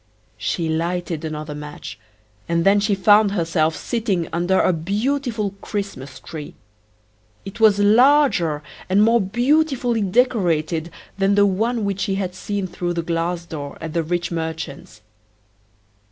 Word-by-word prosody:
She 170 Hz, -2 st, -1 dB
lighted 165 Hz, 0 st, -2 dB
another 155 Hz, -1 st, -5 dB
match, 150 Hz, 0 st, -8 dB, 0.5 s
and 170 Hz, 0 st, +1 dB
then 200 Hz, +1 st, +5 dB
she 205 Hz, 0 st, +1 dB
found 205 Hz, +1 st, +4 dB
herself 165 Hz, -3 st, +1 dB
sitting 215 Hz, -8 st, -2 dB
under 175 Hz, +3 st, +1 dB
a 185 Hz, -, +3 dB
beautiful 215 Hz, -, -1 dB
Christmas 195 Hz, -11 st, -5 dB
tree. 155 Hz, -3 st, -9 dB, 0.9 s
It 195 Hz, +4 st, -8 dB
was 215 Hz, -2 st, +5 dB
larger 210 Hz, -, +4 dB, 0.3 s
and 200 Hz, +3 st, +4 dB
more 230 Hz, +1 st, +4 dB
beautifully 245 Hz, +2 st, +1 dB
decorated 180 Hz, -7 st, +1 dB, 0.3 s
than 195 Hz, +1 st, +3 dB
the 205 Hz, 0 st, +5 dB
one 220 Hz, +3 st, 0 dB
which 200 Hz, -1 st, -2 dB
she 195 Hz, 0 st, -1 dB
had 190 Hz, -2 st, -3 dB
seen 200 Hz, +1 st, -3 dB
through 175 Hz, -1 st, -3 dB
the 170 Hz, -1 st, -2 dB
glass 170 Hz, +1 st, -2 dB
door 145 Hz, -4 st, -7 dB
at 160 Hz, -1 st, -6 dB
the 170 Hz, -, +1 dB
rich 175 Hz, +2 st, -2 dB
merchant's. 160 Hz, -8 st, -5 dB
185 Hz, 140 wpm, -21 LUFS, 165-210 Hz, 0.9 s, then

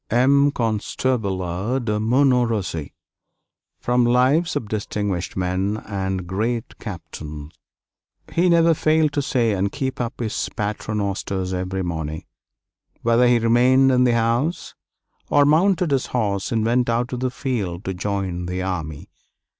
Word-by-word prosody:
M. 135 Hz, +4 st, +4 dB
LE 145 Hz, -, +3 dB
CONSTABLE 110 Hz, -3 st, -1 dB
ANNE 105 Hz, +9 st, -2 dB
DE 105 Hz, -1 st, 0 dB
MONTMORENCY 115 Hz, -, +1 dB, 0.9 s
From 125 Hz, 0 st, +2 dB
'Lives 130 Hz, +8 st, +3 dB
of 110 Hz, -, -2 dB
Distinguished 105 Hz, -4 st, -3 dB
Men 95 Hz, +3 st, -1 dB
and 95 Hz, -2 st, -3 dB
Great 110 Hz, +6 st, -3 dB
Captains' 80 Hz, -6 st, -8 dB, 0.8 s
He 180 Hz, +2 st, +3 dB
never 165 Hz, -1 st, +5 dB
failed 155 Hz, -1 st, +2 dB
to 145 Hz, -, +1 dB
say 125 Hz, -5 st, +1 dB
and 100 Hz, 0 st, 0 dB
keep 135 Hz, -3 st, -3 dB
up 120 Hz, +1 st, -4 dB
his 115 Hz, -3 st, -2 dB, 0.2 s
paternosters 100 Hz, -3 st, -2 dB
every 95 Hz, +1 st, -2 dB
morning, 80 Hz, -3 st, -4 dB, 0.8 s
whether 115 Hz, +1 st, +4 dB
he 120 Hz, 0 st, +5 dB
remained 125 Hz, +3 st, +4 dB
in 125 Hz, 0 st, +4 dB
the 125 Hz, -1 st, +3 dB
house, 120 Hz, +8 st, 0 dB, 0.6 s
or 145 Hz, -, +5 dB
mounted 175 Hz, +2 st, +3 dB
his 135 Hz, -2 st, +1 dB
horse 100 Hz, -5 st, -1 dB
and 110 Hz, -2 st, +1 dB
went 120 Hz, +1 st, +2 dB
out 120 Hz, +1 st, 0 dB
to 125 Hz, -, -4 dB
the 130 Hz, +1 st, -1 dB
field 110 Hz, -9 st, -3 dB
to 95 Hz, -, -2 dB
join 95 Hz, -2 st, -3 dB
the 90 Hz, +1 st, -3 dB
army. 80 Hz, -6 st, -4 dB
115 Hz, 140 wpm, -22 LUFS, 95-125 Hz, 0.9 s, never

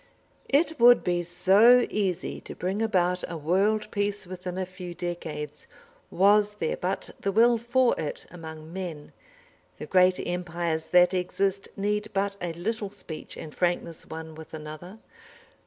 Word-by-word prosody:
It 315 Hz, +2 st, +2 dB
would 245 Hz, +1 st, +7 dB
be 175 Hz, -1 st, +1 dB
so 195 Hz, +8 st, +5 dB
easy 190 Hz, -4 st, -2 dB
to -, -, -9 dB
bring 190 Hz, +4 st, -2 dB
about 180 Hz, -4 st, +1 dB
a 170 Hz, -, -4 dB
world 200 Hz, +8 st, +1 dB
peace 205 Hz, 0 st, -1 dB
within 180 Hz, 0 st, -6 dB
a 190 Hz, -, -1 dB
few 180 Hz, -1 st, -9 dB
decades, 160 Hz, -4 st, -5 dB, 0.4 s
was 205 Hz, +2 st, +4 dB
there -, -, -1 dB
but 185 Hz, +2 st, -3 dB
the 195 Hz, -, -1 dB
will 230 Hz, +3 st, +4 dB
for 240 Hz, +2 st, +2 dB
it 150 Hz, -, -4 dB
among 160 Hz, -1 st, -9 dB
men! 170 Hz, -6 st, -6 dB, 0.6 s
The -, -, -6 dB
great 185 Hz, 0 st, +4 dB
empires 170 Hz, -2 st, -2 dB
that 180 Hz, +2 st, +5 dB
exist 195 Hz, +2 st, -1 dB
need 210 Hz, +1 st, -1 dB
but 200 Hz, +1 st, 0 dB
a 175 Hz, -1 st, -2 dB
little 205 Hz, +4 st, -3 dB
speech 190 Hz, -5 st, -9 dB
and 155 Hz, -, -8 dB
frankness 175 Hz, -2 st, -2 dB
one 160 Hz, 0 st, -7 dB
with 160 Hz, 0 st, -10 dB
another. 155 Hz, +6 st, -9 dB
180 Hz, 150 wpm, -27 LUFS, 170-205 Hz, 0.6 s, would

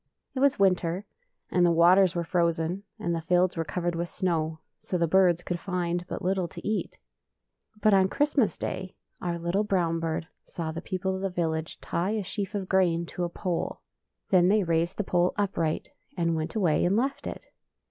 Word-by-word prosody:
It 265 Hz, -, -3 dB
was 280 Hz, 0 st, +4 dB
winter, 185 Hz, -1 st, +2 dB, 0.5 s
and 180 Hz, -, +3 dB
the 175 Hz, -, +5 dB
waters 175 Hz, +2 st, +5 dB
were 170 Hz, -, 0 dB
frozen, 170 Hz, +1 st, 0 dB, 0.2 s
and 170 Hz, -, -2 dB
the 165 Hz, -, -1 dB
fields 180 Hz, +2 st, +2 dB
were 165 Hz, -, -1 dB
covered 175 Hz, +1 st, -2 dB
with 170 Hz, +1 st, -3 dB
snow, 160 Hz, -3 st, -1 dB, 0.2 s
so 180 Hz, -, -2 dB
the 170 Hz, -, +2 dB
birds 175 Hz, 0 st, +4 dB
could 175 Hz, -1 st, -3 dB
find 175 Hz, -1 st, -2 dB
but -, -, -5 dB
little 185 Hz, -1 st, +1 dB
to 170 Hz, +1 st, -8 dB
eat. 215 Hz, 0 st, -2 dB, 0.8 s
But 215 Hz, 0 st, +5 dB
on 190 Hz, -1 st, +5 dB
Christmas 290 Hz, -4 st, +1 dB
day 185 Hz, 0 st, -4 dB, 0.3 s
our 175 Hz, -1 st, -2 dB
little 170 Hz, +5 st, 0 dB
brown 175 Hz, -5 st, +1 dB
bird 160 Hz, 0 st, -2 dB, 0.2 s
saw 165 Hz, -2 st, -5 dB
the 165 Hz, +1 st, -5 dB
people 190 Hz, +1 st, -2 dB
of 190 Hz, -, -5 dB
the 195 Hz, -, 0 dB
village 160 Hz, -3 st, -2 dB
tie 190 Hz, +6 st, -1 dB
a 210 Hz, -, -2 dB
sheaf 200 Hz, +2 st, -4 dB
of 195 Hz, -2 st, -2 dB
gi'ain 175 Hz, -3 st, +2 dB
to 175 Hz, -, -2 dB
a -, -, -3 dB
pole. 175 Hz, 0 st, -3 dB, 0.5 s
Then 180 Hz, -2 st, +6 dB
they 205 Hz, +2 st, +4 dB
raised 170 Hz, +2 st, 0 dB
the 210 Hz, -, 0 dB
pole 180 Hz, -1 st, +1 dB
upright, 170 Hz, -6 st, -1 dB, 0.3 s
and 170 Hz, -1 st, +1 dB
went 160 Hz, +3 st, -3 dB
away 175 Hz, -8 st, +2 dB
and 180 Hz, +3 st, +3 dB
left 270 Hz, +4 st, -1 dB
it. -, -, -6 dB
175 Hz, 195 wpm, -27 LUFS, 170-190 Hz, 0.8 s, Then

